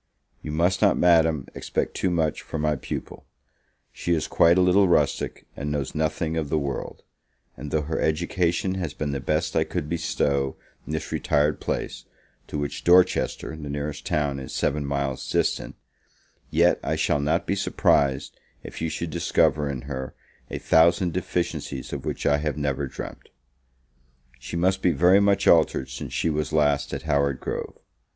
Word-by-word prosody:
You 75 Hz, -, -6 dB
must 85 Hz, +5 st, +1 dB
not, 100 Hz, -, +4 dB
Madam, 80 Hz, -5 st, +4 dB
expect -, -, -2 dB
too 95 Hz, -, 0 dB
much 80 Hz, -3 st, 0 dB
from 80 Hz, -, -5 dB
my 75 Hz, -1 st, +2 dB
pupil; 65 Hz, -, -7 dB, 0.6 s
she 85 Hz, -, -1 dB
is 80 Hz, -, -2 dB
quite 85 Hz, +2 st, +4 dB
a -, -, +5 dB
little 95 Hz, +2 st, +5 dB
rustic, 85 Hz, -, +1 dB
and 70 Hz, +1 st, -4 dB
knows 70 Hz, -2 st, -2 dB
nothing 80 Hz, +1 st, -1 dB
of 75 Hz, -3 st, -2 dB
the 80 Hz, -, +1 dB
world; 70 Hz, -2 st, -4 dB, 0.5 s
and 75 Hz, -, -7 dB
though 75 Hz, +1 st, 0 dB
her 80 Hz, +2 st, -3 dB
education 85 Hz, +3 st, 0 dB
has 90 Hz, -6 st, -4 dB
been 75 Hz, -2 st, -2 dB
the 70 Hz, -, -2 dB
best 75 Hz, +4 st, -1 dB
I -, -, +4 dB
could 75 Hz, -, -4 dB
bestow 70 Hz, -4 st, -1 dB, 0.3 s
in 75 Hz, -, -4 dB
this 80 Hz, -, -4 dB
retired 75 Hz, +1 st, +1 dB
place, -, -, -4 dB, 0.4 s
to -, -, -4 dB
which 75 Hz, -1 st, -4 dB
Dorchester, 90 Hz, -2 st, +3 dB
the 75 Hz, -2 st, -7 dB
nearest 75 Hz, 0 st, -4 dB
town, 70 Hz, -2 st, -1 dB
is 65 Hz, -, -7 dB
seven 75 Hz, 0 st, 0 dB
miles 70 Hz, -2 st, -2 dB
distant, -, -, 0 dB, 0.7 s
yet -, -, +3 dB
I -, -, -1 dB
shall 75 Hz, -, +1 dB
not 80 Hz, +4 st, 0 dB
be -, -, 0 dB
surprised 70 Hz, -8 st, +1 dB, 0.3 s
if -, -, -9 dB
you 80 Hz, -, 0 dB
should 80 Hz, +1 st, -4 dB
discover 75 Hz, 0 st, +2 dB
in 65 Hz, -3 st, -4 dB
her 65 Hz, -1 st, -6 dB, 0.3 s
a -, -, -4 dB
thousand 85 Hz, +2 st, +3 dB
deficiencies 85 Hz, -7 st, -3 dB
of -, -, -5 dB
which -, -, -4 dB
I 70 Hz, 0 st, +3 dB
have 75 Hz, -1 st, -2 dB
never 70 Hz, -1 st, -1 dB
dreamt. -, -, -9 dB, 1.1 s
She 65 Hz, +6 st, -7 dB
must 95 Hz, +3 st, +1 dB
be 90 Hz, -, +3 dB
very 90 Hz, +3 st, +5 dB
much 100 Hz, -1 st, +2 dB
altered 65 Hz, -, +4 dB
since 65 Hz, -, -6 dB
she 80 Hz, -, 0 dB
was 75 Hz, 0 st, -2 dB
last 75 Hz, -2 st, +2 dB
at 70 Hz, -2 st, -4 dB
Howard 70 Hz, -3 st, +1 dB
Grove. -, -, -5 dB
75 Hz, 175 wpm, -25 LUFS, 70-85 Hz, 1.1 s, a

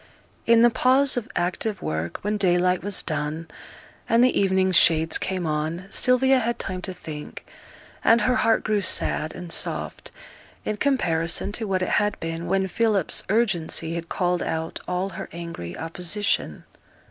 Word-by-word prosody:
In 230 Hz, 0 st, +6 dB
the 240 Hz, -, +6 dB
pause 260 Hz, +3 st, +3 dB
of 245 Hz, -1 st, -3 dB
active 190 Hz, +4 st, -1 dB
work, 80 Hz, +2 st, -3 dB
when 210 Hz, +1 st, 0 dB
daylight 180 Hz, -2 st, +2 dB
was 205 Hz, -1 st, 0 dB
done, 155 Hz, +1 st, -3 dB, 0.6 s
and 230 Hz, +1 st, +5 dB
the 255 Hz, -, +3 dB
evening 190 Hz, -1 st, +2 dB
shades 160 Hz, -2 st, +4 dB
came 185 Hz, -2 st, -3 dB
on, 155 Hz, +3 st, -2 dB
Sylvia 260 Hz, +1 st, +3 dB
had 235 Hz, 0 st, -1 dB
time 185 Hz, -1 st, -4 dB
to 185 Hz, -, -4 dB
think; 155 Hz, -4 st, -9 dB, 0.6 s
and 230 Hz, +1 st, +5 dB
her 255 Hz, 0 st, +2 dB
heart 225 Hz, -, +2 dB
grew 215 Hz, -2 st, +1 dB
sad 155 Hz, -3 st, +1 dB
and 175 Hz, -2 st, -7 dB
soft, -, -, -2 dB, 0.6 s
in 215 Hz, -, -2 dB
comparison 175 Hz, -, 0 dB
to 220 Hz, +1 st, -4 dB
what 185 Hz, -1 st, 0 dB
it -, -, -2 dB
had 210 Hz, 0 st, -1 dB
been 165 Hz, +1 st, -4 dB
when 190 Hz, +1 st, +1 dB
Philip's 205 Hz, -2 st, 0 dB
urgency 180 Hz, -7 st, 0 dB
had 170 Hz, 0 st, -5 dB
called 180 Hz, -1 st, 0 dB
out 160 Hz, 0 st, -3 dB
all 180 Hz, +2 st, -1 dB
her 175 Hz, -, -7 dB
angry 165 Hz, -, -7 dB
opposition. 180 Hz, +5 st, -2 dB
185 Hz, 160 wpm, -24 LUFS, 165-215 Hz, 0.6 s, In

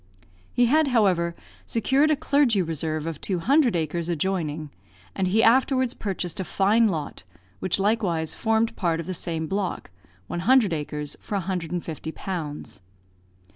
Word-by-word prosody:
He 245 Hz, -, +3 dB
had, 305 Hz, +5 st, +3 dB
however, 185 Hz, -9 st, +2 dB, 0.3 s
secured 265 Hz, +7 st, +2 dB
a 310 Hz, -, +4 dB
clergy 280 Hz, -7 st, +2 dB
reserve 155 Hz, -1 st, -3 dB
of 165 Hz, -3 st, -5 dB
two 190 Hz, -, -1 dB
hundred 260 Hz, -, +3 dB
acres 165 Hz, +1 st, -2 dB
adjoining; 160 Hz, -3 st, -2 dB, 0.4 s
and 190 Hz, -, 0 dB
he 220 Hz, +5 st, +3 dB
afterwards 260 Hz, +1 st, +3 dB
purchased 190 Hz, -4 st, -4 dB
a -, -, 0 dB
fine 210 Hz, +5 st, +3 dB
lot, 155 Hz, -7 st, -4 dB, 0.4 s
which 185 Hz, -, 0 dB
likewise 195 Hz, -6 st, 0 dB
formed 225 Hz, 0 st, +1 dB
part 165 Hz, -3 st, 0 dB
of 165 Hz, -, -4 dB
the 185 Hz, -, -3 dB
same 165 Hz, -2 st, -3 dB
block, 190 Hz, -, -3 dB, 0.3 s
one 175 Hz, -, -4 dB
hundred 225 Hz, -1 st, +4 dB
acres, 150 Hz, -1 st, -4 dB
for 210 Hz, -, -4 dB
150 175 Hz, -4 st, -3 dB
pounds. 155 Hz, -, -5 dB
185 Hz, 145 wpm, -25 LUFS, 165-225 Hz, 0.4 s, a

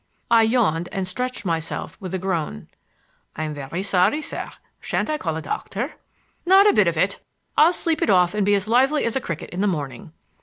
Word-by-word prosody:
I 230 Hz, -1 st, +7 dB
yawned 220 Hz, -8 st, +1 dB
and 190 Hz, -3 st, -2 dB
stretched 250 Hz, +4 st, -4 dB
myself 165 Hz, -2 st, -3 dB
with 185 Hz, -4 st, -6 dB
a -, -, 0 dB
groan. 170 Hz, -, -3 dB, 0.7 s
"I'm 155 Hz, 0 st, -3 dB
very 145 Hz, +6 st, -5 dB
sorry, 200 Hz, +7 st, +2 dB
sir. -, -, -5 dB, 0.3 s
Shan't -, -, -2 dB
I 305 Hz, -, -1 dB
call 160 Hz, -2 st, -2 dB
a 160 Hz, -, -6 dB
doctor?" 215 Hz, -, -4 dB, 0.5 s
"Not 385 Hz, +3 st, +6 dB
a 415 Hz, -, +5 dB
bit 205 Hz, -4 st, +4 dB
of 170 Hz, -1 st, 0 dB
it. 185 Hz, +5 st, +1 dB, 0.4 s
I'll 315 Hz, +3 st, +6 dB
sleep 330 Hz, -2 st, -1 dB
it -, -, +1 dB
off 180 Hz, -2 st, +4 dB
and 210 Hz, -1 st, 0 dB
be 205 Hz, +1 st, +3 dB
as 200 Hz, +1 st, -1 dB
lively 265 Hz, +6 st, +3 dB
as 230 Hz, -, -1 dB
a 265 Hz, -, 0 dB
cricket 165 Hz, -8 st, -6 dB
in 180 Hz, -, -3 dB
the 205 Hz, -, +2 dB
morning." 155 Hz, +1 st, -4 dB
195 Hz, 205 wpm, -23 LUFS, 165-240 Hz, 0.7 s, I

